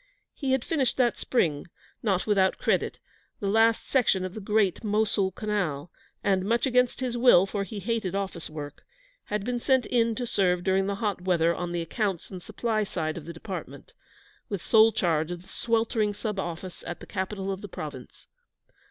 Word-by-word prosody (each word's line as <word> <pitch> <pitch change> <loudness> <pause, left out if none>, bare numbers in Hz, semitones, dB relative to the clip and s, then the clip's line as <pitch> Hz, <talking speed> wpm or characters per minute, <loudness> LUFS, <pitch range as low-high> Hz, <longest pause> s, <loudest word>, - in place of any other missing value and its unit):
He 270 -3 -1
had 265 -2 0
finished 285 -6 +1
that 245 -2 +2
spring, 160 - 0 0.3
not 195 -5 +1
without 195 -3 +3
credit, - - 0 0.4
the 205 - -4
last 225 +2 +3
section 210 -8 +2
of 185 - -5
the 215 - -6
great 205 -1 +1
Mosuhl 210 -2 +1
Canal, 180 -8 -2 0.3
and 190 -2 +2
much 230 +6 +2
against 250 -1 +2
his 250 -2 -1
will, 240 -7 +6
for 200 0 -2
he 200 +2 -6
hated 200 -2 -2
office 190 -4 -3
work 145 -2 -8 0.4
had 210 -1 -2
been 245 0 -1
sent 260 +1 +2
in 230 -2 +2
to 245 - -2
serve 180 -5 +1
during 190 +1 +2
the 200 - -1
hot 205 -3 -1
weather 170 -2 +2
on 175 0 -4
the 170 -1 -1
accounts 195 +1 -2
and 185 -2 -7
supply 215 +2 -1
side 160 -5 -3
of 160 - -7
the 170 - -6
Department, 185 +3 -8 0.6
with 200 -4 -3
sole 225 0 +6
charge 160 -5 +1
of 175 0 -6
the - - -20
sweltering 225 -2 0
sub 210 -2 -3
office 175 0 -5
at 175 - -5
the - - -10
capital 195 0 -3
of 190 0 -5
the 205 - -8
Province. 145 -7 -8
200 Hz, 185 wpm, -27 LUFS, 180-225 Hz, 0.6 s, will